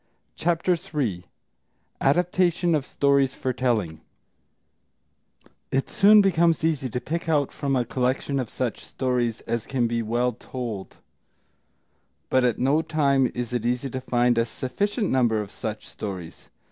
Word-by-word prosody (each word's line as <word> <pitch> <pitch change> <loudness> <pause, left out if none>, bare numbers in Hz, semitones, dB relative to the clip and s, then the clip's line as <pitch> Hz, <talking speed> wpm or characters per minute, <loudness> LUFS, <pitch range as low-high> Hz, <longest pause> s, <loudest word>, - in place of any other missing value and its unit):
] - - -49
CHAPTER 175 +2 +1
III 125 - -3 0.8
ADAPTATION 175 +3 +2
OF 145 -3 0
STORIES 140 -1 +2
FOR 130 - -2
TELLING 110 -11 -1 1.7
It 135 0 -1
soon 210 +1 +6
becomes 170 -4 +3
easy 150 -5 0
to 125 - -2
pick 165 +5 -4
out 145 -4 +2
from 140 -2 -1
a 125 -2 +1
collection 130 +2 -1
such 120 +1 -3
stories 125 -3 -1
as 115 -1 -3
can 125 -3 0
be 115 0 0
well 120 +3 0
told; 115 -4 -7 1.3
but 130 - +4
at 120 -3 +2
no 140 +5 +2
time 140 -5 +2
is 120 0 -4
it 120 -2 -1
easy 125 +2 -1
to 130 - -4
find 120 -2 +2
a 115 - +2
sufficient 200 - -2
number 120 -4 +2
of 105 -1 -5
such 110 -2 -6
stories. 90 -5 -7
130 Hz, 145 wpm, -25 LUFS, 120-150 Hz, 1.7 s, soon